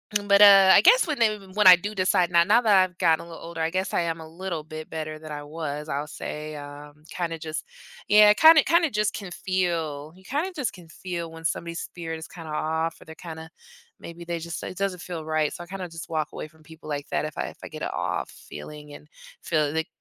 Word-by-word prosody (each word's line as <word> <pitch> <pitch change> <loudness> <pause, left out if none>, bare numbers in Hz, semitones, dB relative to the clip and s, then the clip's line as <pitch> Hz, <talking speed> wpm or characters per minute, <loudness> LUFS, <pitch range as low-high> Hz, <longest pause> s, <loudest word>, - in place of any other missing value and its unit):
Mm, 205 0 0
but, 200 0 +5
uh, 195 -2 +9
I 195 - +8
guess - - +6
when 300 -3 -2
they 230 -2 +4
w 200 -3 -8
when 210 -1 +2
I 185 -1 +11
do 205 +4 -6
decide 185 -2 +2
now 170 -1 +5
now 215 +6 +4
that 215 -4 +4
I've 185 -1 -5
gotten 165 -2 +2
a - - -14
little 165 -1 -11
older, 165 0 -8
I 160 0 0
guess 185 +1 -2
I - - +1
am 165 -1 -2
a 160 - -10
little 170 -1 -5
bit 155 0 -8
better 155 -1 -5
than 155 0 -10
I 145 - -5
was, 150 0 -6
I'll 145 +1 -2
say, 150 0 -7
um, 145 +1 -11
kinda 165 -2 -4
just 155 0 -5 0.4
Yeah, 210 0 +7
kinda 315 +3 +8
kinda 335 -2 +3
just 210 -1 0
can 195 -4 -7
feel 165 -6 -2
you 190 - -19
kinda 295 - -2
just 275 -7 -2
can 175 -3 -14
feel 170 0 -6
when 165 0 -11
somebody's 170 +1 -3
spirit 165 -2 -6
is 160 - -9
kinda 165 -4 -10
off, 160 +2 -2
or - - -14
they're 160 - -11
kinda 160 -1 -9 0.5
maybe 170 0 -10
they 170 0 -3
just 170 +1 -6
it 185 - -7
doesn't 195 -2 -2
feel 170 -4 -6
right, 155 -1 0
so 175 - -8
I - - -14
kinda 185 -1 -6
just 165 0 -9
walk 155 -2 -2
away - - -6
from 160 0 -24
people 160 0 -14
like 145 -1 -4
that - - -1
if 155 - -7
I - - -3
if - - -11
I - - -6
get - - -10
a - - -3
off - - -3
feeling 150 -1 -11
and 150 - -13 0.3
feel 155 -3 0
like, 160 0 -1
165 Hz, 250 wpm, -25 LUFS, 155-190 Hz, 0.5 s, I